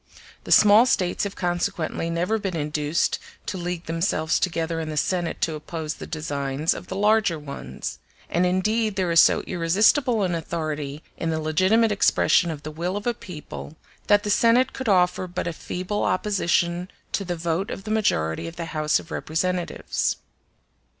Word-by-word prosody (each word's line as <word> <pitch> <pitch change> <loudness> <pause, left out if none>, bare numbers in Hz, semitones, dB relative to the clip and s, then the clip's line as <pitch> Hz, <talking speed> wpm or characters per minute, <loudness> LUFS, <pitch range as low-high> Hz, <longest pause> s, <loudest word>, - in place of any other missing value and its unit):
The - - -6
small 215 +4 +7
States 180 -4 +1
have 200 - -5
consequently 175 -2 -2
never 180 +7 0
been 195 -4 -3
induced 150 0 0 0.3
to - - -4
league 175 -1 -4
themselves 165 -1 0
together 165 -2 -1
in 160 -1 -4
the 155 - -4
Senate 175 +1 -1
to 160 - +1
oppose 155 0 -5
the - - -9
designs 145 -1 -1
of 180 - -9
the 190 - -5
larger 210 -3 +3
ones; 140 - -7 0.3
and 175 - +1
indeed 210 +4 +1
there 185 -3 0
is 165 - +6
so - - +6
irresistible 210 - +2
an 180 -2 0
authority 155 -3 -4
in 165 - -2
the 160 -1 0
legitimate 185 +9 +3
expression 195 -3 +3
of 150 -3 -6
the 155 - -5
will 175 +5 -3
of 205 - -6
a 240 - +1
people 160 -5 -9 0.3
that 205 0 +4
the 205 - -1
Senate 245 +5 +4
could 260 -4 -3
offer 180 -1 +3
but 180 -1 -4
a 170 - -2
feeble 185 +5 -3
opposition 180 -2 0 0.2
to 200 - -1
the 175 -2 -3
vote 170 +3 -2
of 195 - -6
the 215 - -5
majority 80 - 0
of 165 - -8
the 170 - -4
House 155 -1 +2
of 165 - -13
Representatives. 175 +3 -1
175 Hz, 175 wpm, -24 LUFS, 160-200 Hz, 0.3 s, small